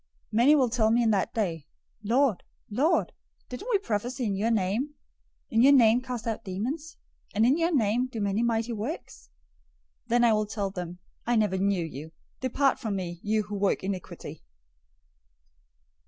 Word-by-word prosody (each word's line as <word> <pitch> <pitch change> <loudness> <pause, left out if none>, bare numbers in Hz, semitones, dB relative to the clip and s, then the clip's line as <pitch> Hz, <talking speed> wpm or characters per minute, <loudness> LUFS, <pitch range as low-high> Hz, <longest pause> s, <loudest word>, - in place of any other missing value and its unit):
007:022 - - -51 0.2
Many 240 +7 +5
will 260 -4 +3
tell 225 -2 +2
me 235 +2 +3
in 225 - +3
that 195 -3 +1
day, 165 -9 -2 0.4
'Lord, 240 0 +2 0.3
Lord, 295 +11 +1 0.4
didn't 250 - -7
we 440 - +4
prophesy 245 - -2
in 200 -2 0
your 210 +4 0
name, 225 +7 0 0.6
in 225 - +3
your 275 +3 +7
name 240 -2 +5
cast 250 -3 -5
out 225 -2 -3
demons, 265 - -4 0.4
and 215 +2 +4
in 260 +4 +4
your 335 +1 +1
name 245 -3 +2
do 240 -3 -6
many 205 +1 0
mighty 235 0 0
works?' 230 - -6 0.8
007:023 - - -44
Then 240 +1 +3
I 235 -2 +5
will 215 0 +1
tell 200 -2 -3
them, 180 -2 -6 0.3
'I 240 - +2
never 210 -4 +2
knew 195 -3 +1
you. 155 +1 -8 0.3
Depart 265 +1 +1
from 215 -4 -3
me, 175 -3 -4
you 215 +1 0
who 205 0 -9
work 200 -1 0
iniquity.' 190 -2 -6
225 Hz, 175 wpm, -27 LUFS, 200-250 Hz, 0.8 s, your